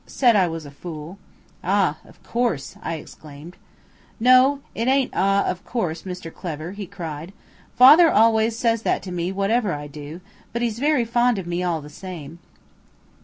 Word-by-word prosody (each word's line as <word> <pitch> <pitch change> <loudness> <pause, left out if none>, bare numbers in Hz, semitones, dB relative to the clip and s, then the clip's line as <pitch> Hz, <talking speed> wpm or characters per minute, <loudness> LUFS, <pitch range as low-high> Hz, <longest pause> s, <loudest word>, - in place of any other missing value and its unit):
"Said 245 -4 +3
I 190 -3 +4
was 165 -2 -5
a 145 - -10
fool." 160 +4 -9 0.4
"Ah! - - +1
of - - -20
course," 230 - -2
I 165 - -3
exclaimed. 155 +2 -11 0.6
"No, 255 +4 +5
it 230 +2 -2
ain't 265 -1 +2
`ah, 195 +1 +2
of 180 +2 -3
course,' 175 -9 -3
Mr 180 -3 -7
Clever," 160 -1 -6
he 200 -1 -7
cried. 165 0 -7 0.4
"Father 305 +7 +8
always 225 -1 +3
says 230 -2 +1
that - - 0
to 185 - -7
me 175 +1 -2
whatever 200 +1 0
I 145 0 -5
do, 145 +3 -9 0.3
but 235 +1 -2
he's 230 -1 -2
very 290 -3 +2
fond 240 0 +2
of 190 - -4
me 175 +1 -2
all 170 -3 -1
the 145 - -11
same." 165 -2 -9
190 Hz, 170 wpm, -22 LUFS, 165-235 Hz, 0.6 s, Father